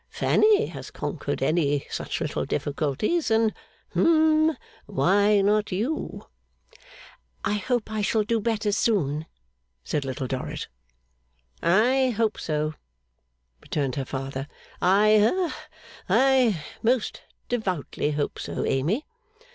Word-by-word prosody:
Fanny 430 0 +3
has - - -8
conquered - - -4
any 145 -4 +1
such - - -3
little - - -2
difficulties, 155 - -1
and 220 -1 +3 0.4
hum 315 -2 +4 0.3
why 200 +8 +3
not 210 +1 +2
you?' 235 +12 -3 1.2
'I - - +1
hope 240 +1 -1
I 215 -1 -1
shall 215 +1 +2
do 225 +2 0
better 215 -2 0
soon,' 160 -9 0 0.6
said 150 - -2
Little 135 0 -4
Dorrit. 130 0 -4 0.9
'I 245 +8 +3
hope 225 -2 +1
so,' 155 0 -1 0.9
returned 140 -4 -2
her 140 - -2
father. 135 +1 -5 0.3
'I 210 +4 +5 0.3
ha - - -10 0.4
I 255 - +3 0.2
most 240 0 0 0.3
devoutly 185 - -2
hope 145 -1 -2
so, - - -3
Amy. 165 - 0
205 Hz, 110 wpm, -25 LUFS, 150-235 Hz, 1.2 s, I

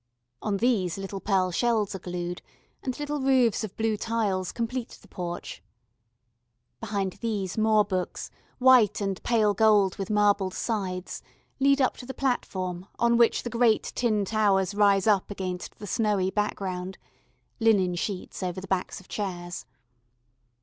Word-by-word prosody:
On 205 -2 -1
these 195 -7 +1
little 195 0 -5
pearl 190 -2 +1
shells 220 +1 +1
are 190 - -5
glued, 175 0 -5 0.4
and 255 -2 -3
little 295 0 -2
roofs 260 -5 +3
of 210 -3 -7
blue 220 -1 +1
tiles 205 -5 -1
complete 235 +1 -4
the - - -19
porch. 175 -2 -6 1.2
Behind 200 -4 -2
these 205 -6 -2
more 215 -1 +3
books, 185 -2 -3 0.3
white 250 -5 +5
and 195 -2 -2
pale 220 -3 +2
gold 210 -4 +4
with 195 +1 -4
marbled 205 -2 +2
sides, 190 -5 -3 0.4
lead 275 +1 +4
up 260 - +2
to 245 - -10
the 265 - -6
platform 185 -9 -2
on 235 0 +3
which 235 -1 +3
the 240 - -3
great 230 -2 +2
tin 215 -4 +1
towers 200 -2 +2
rise 200 -2 +4
up 205 -4 +3
against 185 -3 -5
the 210 - -8
snowy 205 -3 +1
background 190 -3 -3 0.6
(linen 205 -6 +3
sheets 180 +3 -4
over 180 0 -3
the 185 - -8
backs 185 -1 -2
of 185 - -18
chairs). 175 -4 -5
205 Hz, 150 wpm, -27 LUFS, 185-225 Hz, 1.2 s, white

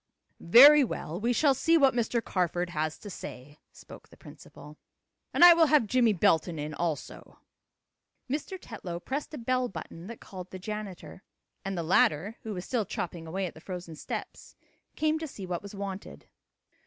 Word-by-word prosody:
"Very 280 - +8
well, 175 -8 -4
we 235 +3 0
shall 275 +3 +3
see 330 +5 +3
what 275 -4 +4
Mr. 235 0 -1
Carford 175 -1 -1
has 155 -1 -2
to 210 - -12
say," 145 -6 -9
spoke - - -14
the - - -18
principal. 150 +1 -14 0.5
"And 350 - +7
I 350 - +11
will 330 -1 +4
have 295 -5 +4
Jimmie 235 +1 +3
Belton 165 -3 +2
in 150 +1 -5
also." 160 -3 -5 0.9
Mr. 295 +8 -4
Tetlow 180 - -7
pressed 275 +10 -5
a - - -7
bell 255 +1 -1
button 165 0 -9
that 235 0 -9
called 185 -2 -10
the 185 - -8
janitor, 200 -2 -7 0.4
and 195 -1 -4
the 170 - -2
latter, 170 +5 +2
who 220 - -6
was 180 0 -6
still 240 -4 -1
chopping 170 -3 -5
away 190 +4 -2
at 175 - -6
the 160 - -14
frozen 180 -3 -7
steps, - - -7 0.4
came 310 0 +1
to 320 - -5
see 200 -8 -8
what 180 -1 -4
was 200 0 -10
wanted. 195 -1 -7
195 Hz, 180 wpm, -28 LUFS, 170-250 Hz, 0.9 s, I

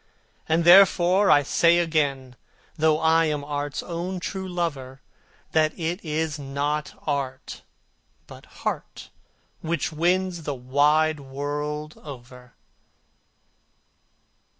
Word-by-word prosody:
And 160 +2 +2
therefore 185 +1 +6
I 145 -1 +6
say 170 +4 +3
again, 145 -6 -1 0.4
though 155 0 +2
I 160 +1 +3
am 150 -2 -2
art's 145 0 -4
own 180 +2 -4
true 190 +1 -5
lover, 145 -7 -4 0.5
That 155 -1 +1
it 170 +3 -3
is 155 -1 -2
not 145 +2 -3
art, 140 -3 -4 0.6
but - - -14
heart, - - -6 0.5
which 165 -2 -2
wins 175 +2 0
the 145 -2 -4
wide 150 +5 +2
world 145 +2 -5
over. 125 -3 -12
155 Hz, 105 wpm, -24 LUFS, 145-170 Hz, 0.6 s, therefore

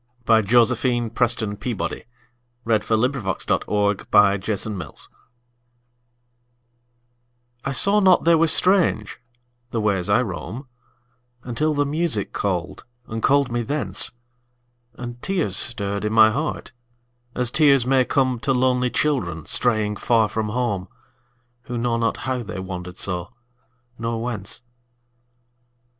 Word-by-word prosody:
By 115 -1 +5
Josephine 120 +1 +2
PrestonPeabody 115 -2 -2 0.6
1671 110 -3 0
After 100 +1 +3
Music 90 -8 -8 2.5
I 135 - -2
SAW 200 +9 +2
not 185 -3 +5
they 170 - +6
were 165 0 +4
strange, 185 -1 +2 0.5
the 115 - -2
ways 100 -4 0
I 105 +5 +4
roam, 120 +6 -6 0.8
Until 150 +6 -1
the 145 0 +2
music 150 -7 -2
called, 90 -4 -2 0.2
and 115 0 -5
called 140 -1 +3
me 120 0 0
thence, 115 -6 -2 0.9
And 120 0 -8
tears 175 - -1
stirred 100 -3 0
in 105 0 -1
my 110 -1 +7
heart 150 +3 -3 0.6
as 125 -2 -1
tears 140 -4 +4
may 130 0 +3
comeTo 130 0 +1
lonely 125 0 +2
children 90 - -1
straying 110 -4 0
far 115 -1 +2
from 110 0 -3
home, 105 -5 -2 0.8
Who 125 -3 -4
know 115 0 0
not 115 -1 0
how 130 -1 -1
they 105 -3 -7
wandered 90 -1 -6
so, 90 +4 -4 0.6
nor 115 0 -2
whence. 115 -1 -5
115 Hz, 115 wpm, -22 LUFS, 105-130 Hz, 2.5 s, my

